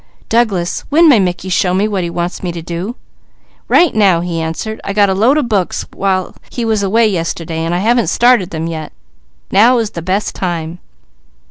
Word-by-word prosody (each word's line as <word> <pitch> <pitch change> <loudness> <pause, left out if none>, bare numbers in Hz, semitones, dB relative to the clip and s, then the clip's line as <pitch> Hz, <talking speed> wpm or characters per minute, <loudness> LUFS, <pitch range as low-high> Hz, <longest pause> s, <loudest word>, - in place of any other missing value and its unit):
"Douglas, 210 -7 0
when 325 +3 +5
may 265 -8 +6
Mickey 185 0 -2
show 180 0 +1
me 200 +3 +1
what 200 -3 -2
he 170 - -3
wants 175 +1 -4
me 180 - -3
to 170 - -6
do?" 175 +7 -5 0.7
"Right 345 -3 +4
now," 195 -6 +3
he 170 -2 -3
answered. 165 +7 -4
"I 200 - -3
got 200 -1 +3
a - - +2
load 230 +9 +3
of 290 -5 0
books 200 -6 -1
while 190 -1 -1
he 240 - -4
was 220 -2 +1
away 220 +4 +3
yesterday 165 -3 -3
and 165 +1 -1
I 185 +4 -1
haven't 235 0 +2
started 240 -7 +3
them 160 0 -4
yet. 160 -2 -6 0.6
Now 230 +6 +5
is 225 -3 -1
the 170 - -6
best 190 +5 -1
time." 170 -2 -4
190 Hz, 200 wpm, -15 LUFS, 175-220 Hz, 0.7 s, may